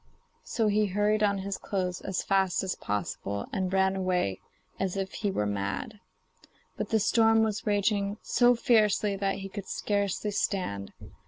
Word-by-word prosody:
So 225 - -1
he 210 0 +3
hurried 210 +2 +1
on 200 -1 +3
his 200 -1 -3
clothes 185 -2 -2
as 190 -2 -2
fast 190 -2 +2
as 190 - -1
possible, 100 0 -3
and 185 -1 -1
ran 190 0 +2
away 180 - 0 0.4
as 190 0 -1
if 195 -1 -3
he 205 - -1
were 105 - 0
mad. 105 - -3 0.8
But - - -4
the 220 - +3
storm 225 +1 +4
was 215 -1 -2
raging 205 0 +1
so 245 0 +4
fiercely 215 -3 +3
that 195 0 0
he 195 - -6
could 195 0 -7
scarcely 205 0 -1
stand. 180 - -2
195 Hz, 160 wpm, -28 LUFS, 185-210 Hz, 0.8 s, storm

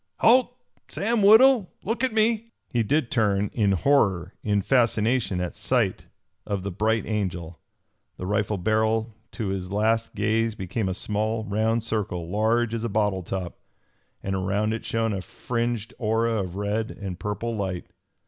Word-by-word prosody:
"Halt! 245 +1 +4 0.3
Sam 225 +2 0
Woodhull, 220 0 +6
look 230 +4 -2
at 260 - +2
me!" 225 +1 +1 0.2
He 120 -4 +2
did 125 +2 0
turn, 105 -2 +1
in 105 -4 +2
horror, 95 - +2
in 100 -2 0
fascination 115 -4 +2
at 90 -1 -3
sight - - 0 0.4
of 100 -2 -3
the 100 - -3
Bright 110 +4 0
Angel. 90 -6 -3 0.6
The - - -5
rifle 105 +1 0
barrel 110 +3 +1 0.2
to 110 -5 -3
his 95 -1 -3
last 110 +2 +1
gaze 110 +2 +1
became 95 +1 -2
a 95 - -2
small, 110 +2 -1
round 110 +2 0
circle, 100 -7 -2
large 110 +4 +1
as 115 -1 -2
a 115 - -1
bottle 105 -2 +1
top, 90 0 -5 0.6
and 95 - -2
around 100 +3 0
it 110 - -4
shone 115 -1 0
a 95 - -3
fringed 115 +1 -3
aura 115 -1 +1
of 90 -1 -7
red 105 +2 -1
and 95 -4 -7
purple 110 +4 -3
light. 95 -4 -3
110 Hz, 160 wpm, -25 LUFS, 100-115 Hz, 0.6 s, Woodhull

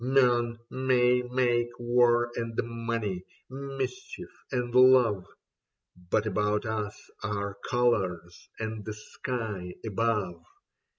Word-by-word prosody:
Men 120 -3 +3
may 125 -1 +3
make 125 -1 +1
war 120 0 +3
and 115 -1 -3
money, 115 -5 -3 0.3
mischief 135 +7 -5 0.2
and 125 -2 -1
love 125 -7 +6 0.4
—, - - -59
But 110 - +2
about 105 0 0
us 105 -2 -3 0.2
are 100 -2 -2
colours 95 -9 0
and 110 -1 -4
the 110 0 -5
sky 105 -5 -5
above. 105 -5 -1
115 Hz, 105 wpm, -29 LUFS, 105-125 Hz, 0.4 s, love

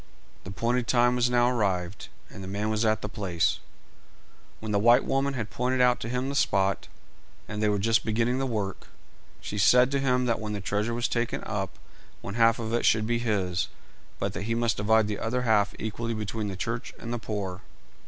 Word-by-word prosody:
The - - -7
appointed 115 +5 -1
time 120 0 +3
was 125 0 +2
now 120 0 +3
arrived, 100 -6 -1 0.2
and 95 - -9
the - - -7
man 105 +3 -2
was 110 +1 0
at 110 -1 +1
the - - -2
place. 95 -6 -1 1.0
When 110 -1 -5
the 100 - +2
white 120 +4 +5
woman 135 0 0
had 110 -4 -4
pointed 125 +1 0
out 125 0 +4
to 115 - -5
him 125 +2 -1
the 140 - -3
spot, 95 -8 +1 0.6
and 105 0 -4
they 105 - +3
were 105 - +1
just 115 +2 +2
beginning 115 +3 0
the 135 - 0
work, 105 -5 -3 0.5
she 105 - -4
said 125 +5 +5
to 140 - +1
him 125 -2 +1
that 115 -3 0
when 105 -1 -4
the 105 - -3
treasure 105 +4 -1
was 120 0 0
taken 120 -1 -2
up 95 -3 -4 0.4
one 100 - -6
half 115 0 +4
of 115 -1 -4
it 120 - +1
should 110 -1 +3
be 120 +1 0
his, 100 -5 0 0.5
but - - -2
that - - -4
he 115 - +1
must 115 -4 +1
divide 110 +1 +3
the 105 -1 -3
other 125 +3 -1
half 105 -4 +2
equally 115 +2 -3
between 110 0 -3
the 95 - -4
church 115 +3 -4
and 115 0 -6
the 120 - -2
poor. 100 -4 -4
110 Hz, 210 wpm, -27 LUFS, 105-120 Hz, 1.0 s, white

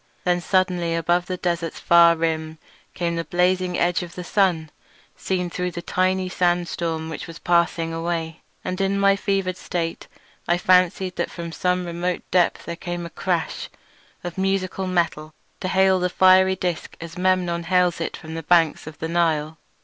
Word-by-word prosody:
Then 180 0 +1
suddenly 180 -2 +1
above 175 +1 +1
the 185 - -3
desert's 170 -2 -2
far 170 -1 +6
rim 160 -1 -2 0.4
came 170 -1 -1
the 165 - -1
blazing 180 +1 +1
edge 175 +3 +1
of 175 -1 -8
the 180 - -6
sun, 175 -5 +1 0.4
seen 180 -2 -2
through 180 +1 -3
the 175 0 -7
tiny 185 +1 0
sandstorm 175 -2 -1
which 160 - -6
was 165 0 -9
passing 170 -1 +1
away, 165 -1 -3 0.2
and 185 +1 -2
in 195 +1 +1
my 195 0 +4
fevered 195 -2 -1
state 165 -2 -4 0.4
I 175 - +3
fancied 185 +1 +2
that - - -1
from 170 -1 -7
some 180 +2 0
remote 175 +1 -3
depth 180 -1 +2
there 170 - -4
came 175 0 -5
a 170 - -8
crash 175 -3 -2 0.5
of 175 +1 -6
musical 190 0 -1
metal 160 -4 -1 0.2
to 185 - -3
hail 190 0 +3
the 180 0 0
fiery 190 +1 +5
disc 180 -3 -4
as 165 0 -8
Memnon 180 -2 0
hails 180 -1 +2
it - - -3
from 160 0 -9
the 165 - -4
banks 165 -1 +2
of 155 - -9
the 160 - -4
Nile. 160 -2 0
175 Hz, 170 wpm, -23 LUFS, 165-185 Hz, 0.5 s, far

